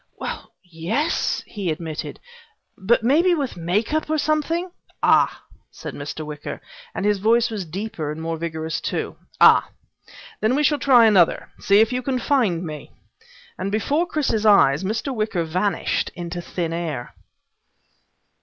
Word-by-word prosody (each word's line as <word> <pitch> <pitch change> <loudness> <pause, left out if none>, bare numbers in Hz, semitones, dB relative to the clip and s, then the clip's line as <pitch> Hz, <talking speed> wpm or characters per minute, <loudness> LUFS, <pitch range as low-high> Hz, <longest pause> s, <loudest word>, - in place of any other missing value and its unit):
"Well - - -6
yes," 185 - -1
he 200 -5 -4
admitted, 155 0 -5 0.6
"but 220 +4 +1
maybe 335 +9 +4
with 280 -6 -3
make 180 - -1
up, 310 0 -1
or 315 - +1
something 315 +4 0 0.2
" - - -33
"Ah," - - +3 0.3
said - - -8
Mr. 150 +2 -6
Wicker, 150 -1 -6 0.4
and 195 - -2
his 205 -1 +2
voice 230 +3 +3
was 205 -4 -4
deeper 165 -3 -4
and 155 - -6
more 165 0 -3
vigorous 160 -1 -4
too. - - -3 0.2
"Ah. - - +6 0.7
Then 220 +4 +2
we 295 - +1
shall 295 0 +2
try 250 -4 +6
another. 195 -6 +3
See 200 +2 +4
if 225 +2 +2
you 250 - -1
can 255 0 -1
find 230 - +1
me." 155 -2 -7 0.7
And 195 - -2
before 285 - 0
Chris's 270 -10 0
eyes 195 -8 +5
Mr. 220 +7 -2
Wicker 215 -6 -1
vanished 180 +3 -1
into 175 0 -5
thin 170 -1 -3
air. 155 -8 -4
205 Hz, 155 wpm, -22 LUFS, 165-255 Hz, 0.7 s, Ah